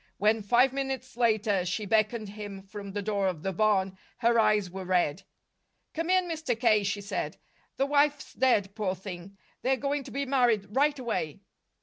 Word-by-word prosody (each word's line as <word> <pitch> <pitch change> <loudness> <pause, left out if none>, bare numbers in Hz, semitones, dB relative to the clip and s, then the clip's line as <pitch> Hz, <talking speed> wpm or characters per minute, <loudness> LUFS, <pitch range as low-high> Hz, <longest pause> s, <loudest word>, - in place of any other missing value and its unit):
When, 215 +2 +2
five 245 +6 +3
minutes 265 -2 -4
later, 220 -5 +2
she 195 +4 -2
beckoned 215 +1 +1
him 205 -2 -8
from 200 0 -8
the 205 0 -3
door 200 -2 0
of 175 -5 -3
the 195 - -1
barn, 190 -1 +1 0.2
her 235 -1 +3
eyes 215 -3 +3
were 190 +1 -7
red. 180 -2 +1 0.7
"Come 330 +2 -3
in, 370 -1 +3
Mr. 315 -8 -2
K.," 215 -4 +4
she 200 +1 -2
said. 200 - -4 0.4
"The 270 - +2
wife's 290 0 +1
dead, 205 -7 +2
poor 200 -3 -1
thing. 190 0 -9 0.2
They're 265 +1 +2
going 280 +1 -1
to - - -8
be 280 +1 -2
married 245 -6 +2
right 290 +5 +2
away." 185 - -3
215 Hz, 180 wpm, -28 LUFS, 195-260 Hz, 0.7 s, K